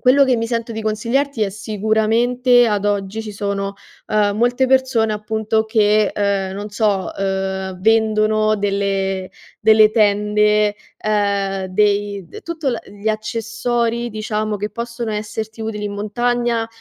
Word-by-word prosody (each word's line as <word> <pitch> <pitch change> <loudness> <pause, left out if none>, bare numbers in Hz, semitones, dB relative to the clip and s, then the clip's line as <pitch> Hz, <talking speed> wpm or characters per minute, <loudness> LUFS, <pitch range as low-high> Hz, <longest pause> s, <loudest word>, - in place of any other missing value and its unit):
quello 275 +2 +5
che 260 -2 +2
mi 230 - -1
sento 230 0 -3
di 220 - -4
consigliarti 230 +4 -1
è 200 - 0
sicuramente, 220 +4 +2
ad 205 -2 0
oggi, 205 +1 -1
ci 215 -1 -7
sono, 200 -1 -3 0.3
ehm, 205 -1 +1
molte 245 +3 +2
persone 255 -4 +2
appunto 220 +1 -1
che, 215 -1 +3
ehm, 200 -2 0
non 205 +2 -6
so, 205 -3 0
ehm, 190 -1 -2
vendono 215 0 +3
delle 195 -2 -1 0.3
delle 215 0 +6
tende, 210 -1 +3 0.2
ehm, 200 -2 0
dei 200 0 0
d - - -11
tutto 325 -5 -3
la 235 - -3
gli 205 +2 -5
accessori 230 +2 -1
diciamo 215 -1 -2
che 210 +1 -4
possono 235 -1 -5
esserti 215 +1 -5
utili 215 -1 -4
in 205 - -3
montagna 235 +3 -1
215 Hz, 140 wpm, -19 LUFS, 205-230 Hz, 0.3 s, delle